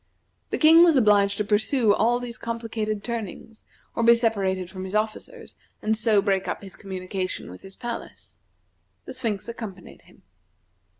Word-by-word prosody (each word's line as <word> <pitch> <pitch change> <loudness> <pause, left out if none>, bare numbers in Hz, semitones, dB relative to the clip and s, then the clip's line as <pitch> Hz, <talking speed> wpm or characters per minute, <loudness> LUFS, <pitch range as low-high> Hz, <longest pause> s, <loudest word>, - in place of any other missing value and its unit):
The - - -1
King 325 +2 +8
was 335 -3 +5
obliged 205 -5 +4
to 210 - 0
pursue 215 +2 +2
all 235 +4 +2
these 245 0 -7
complicated 225 -2 -3
turnings, 225 -1 -6 0.3
or - - -2
be 235 +1 +7
separated 195 -6 0
from 185 +1 -8
his 190 +2 -5
officers, 220 - -3 0.2
and 220 +1 0
so 215 -2 +2
break 195 -2 0
up - - -4
his 195 - -10
communication 185 - -5
with 90 - -12
his 195 0 -12
palace. 240 -1 -7 0.7
The - - -7
Sphinx 210 -5 -2
accompanied 215 -6 -8
him. - - -23
215 Hz, 160 wpm, -25 LUFS, 195-235 Hz, 0.7 s, King